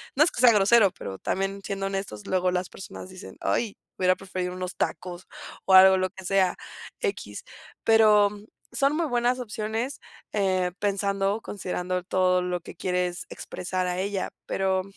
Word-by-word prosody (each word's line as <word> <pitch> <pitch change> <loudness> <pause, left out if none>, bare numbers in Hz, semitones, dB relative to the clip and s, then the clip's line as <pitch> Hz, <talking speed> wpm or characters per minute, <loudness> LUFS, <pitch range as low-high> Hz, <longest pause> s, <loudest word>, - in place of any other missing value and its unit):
no 290 - +6
es 330 - +2
que - - -3
sea 245 -2 +8
grosero, 210 +1 +5
pero 95 - -8
también 195 +1 -2
siendo 195 0 -3
honestos, 195 - -5
luego 185 -1 +1
las 180 0 -1
personas 185 -1 -9
dicen: 185 +1 -11
"Ay, 220 -4 -1 0.2
hubiera 185 0 +3
preferido 185 -1 -4
unos 185 0 -5
tacos", 180 0 -4 0.4
o 190 - +2
algo, 190 0 +9
lo 185 0 0
que 190 0 -12
sea, 190 -1 +2 0.4
equis, 425 -4 -4 0.4
pero, 215 -2 +5
mm, 205 0 -11 0.3
son 275 +4 +1
muy 330 0 0
buenas 245 0 +1
opciones, 225 +3 -3 0.3
eh, 185 -3 +1
pensando, 200 +1 0
considerando 180 -3 -3
todo 185 -1 +2
lo 180 0 -2
que - - -11
quieres 180 0 -2
expresar 185 0 -4
a 180 0 -2
ella, 195 +1 -2 0.2
pero, 190 -1 0
195 Hz, 165 wpm, -26 LUFS, 185-210 Hz, 0.4 s, algo